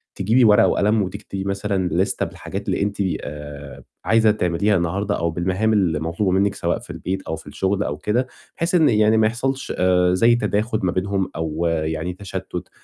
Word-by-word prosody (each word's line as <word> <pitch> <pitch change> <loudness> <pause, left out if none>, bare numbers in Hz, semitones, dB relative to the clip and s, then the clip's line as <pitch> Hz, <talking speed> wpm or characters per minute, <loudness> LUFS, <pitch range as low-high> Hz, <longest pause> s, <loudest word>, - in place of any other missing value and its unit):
تجيبي 110 +6 +3
ورقة 105 -1 +6
وقلم 105 +1 +2
وتكتبي 95 +1 -6
مثلًا 100 -1 -1
ليستة - - 0
بالحاجات - - -7
اللي - - 0
أنتِ 100 0 -1 0.2
آآ 75 -1 -8 0.2
عايزة 115 -1 +4
تعمليها 100 0 +1
النهارده 95 +4 -1
أو 85 0 -1
بالمهام 95 +6 0
اللي 90 -7 +2
مطلوبة 85 +5 -1
منِّك 100 +2 +2
سواء - - -1
في - - -16
البيت 95 +1 -4
أو 80 - -2
في - - -13
الشُغل 100 +1 -1
أو 75 - -3
كده 120 +10 0 0.3
بحيث 170 +2 0
إن 160 -4 +5
يعني 110 0 +4
ما 110 -1 +4
يحصلش 130 +4 -2
آآ 90 -1 +3
زي 115 +6 +4
تَداخُل 110 -1 0
ما 90 - +2
بينهم 95 +1 -1
أو 80 +1 -2
يعني 80 +1 -2
تشتُّت 95 -1 -6
95 Hz, 180 wpm, -21 LUFS, 85-105 Hz, 0.3 s, ورقة